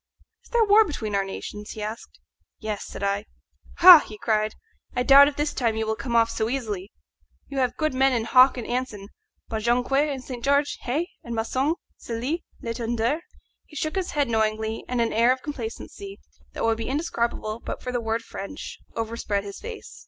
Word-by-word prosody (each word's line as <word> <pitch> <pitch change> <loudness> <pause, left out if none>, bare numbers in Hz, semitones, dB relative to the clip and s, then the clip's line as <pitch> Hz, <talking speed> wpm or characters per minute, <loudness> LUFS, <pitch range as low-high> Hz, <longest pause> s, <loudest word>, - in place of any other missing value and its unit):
"Is - - -20
there 475 -1 +3
war 420 +1 +7
between 245 - -4
our 200 0 +2
nations?" 205 +2 -7
he 215 - -6
asked. 215 +2 -7 0.4
"Yes," 215 -2 -4
said - - -7
I. 200 +1 0 0.6
"Ha!" 355 -2 +12
he 215 - -9
cried, 215 -1 0 0.4
"I 250 - +1
doubt 280 +2 +9
if 290 - -2
this 295 +1 -1
time 230 -4 0
you 220 0 -1
will 220 0 -1
come 235 0 -4
off 230 0 +4
so 220 - -1
easily. 215 -7 -3 0.6
You 275 - -3
have 250 -2 0
good 310 -3 0
men 265 +1 +3
in 235 -3 0
Hawke 255 +2 +6
and 240 - -4
Anson; 240 -5 -3 0.4
but 220 -2 -3
Jonquière 250 +6 +2
and 265 -2 -5
St. 245 -3 -7
George, 280 +1 +2
hey? 295 +8 -1 0.2
and 235 -1 -5
Maçon, 260 +7 0 0.2
Cellie, 250 +9 -3 0.2
Letenduer!" 235 +4 -1 0.5
He 300 - -16
shook 310 +4 -2
his 380 -2 -2
head 290 -2 +1
knowingly, 220 -1 0
and 250 -1 0
an 230 - 0
air 235 +3 +4
of 255 0 -1
complacency, 295 - -7 0.3
that - - -4
would 225 0 +2
be 225 - -3
indescribable 235 -7 -2
but - - -6
for 250 - -3
the 245 -1 -1
word 225 0 -1
French, 215 +7 -7 0.2
overspread 225 -3 -2
his 200 -1 -8
face. 460 0 -9
235 Hz, 195 wpm, -25 LUFS, 220-280 Hz, 0.6 s, Ha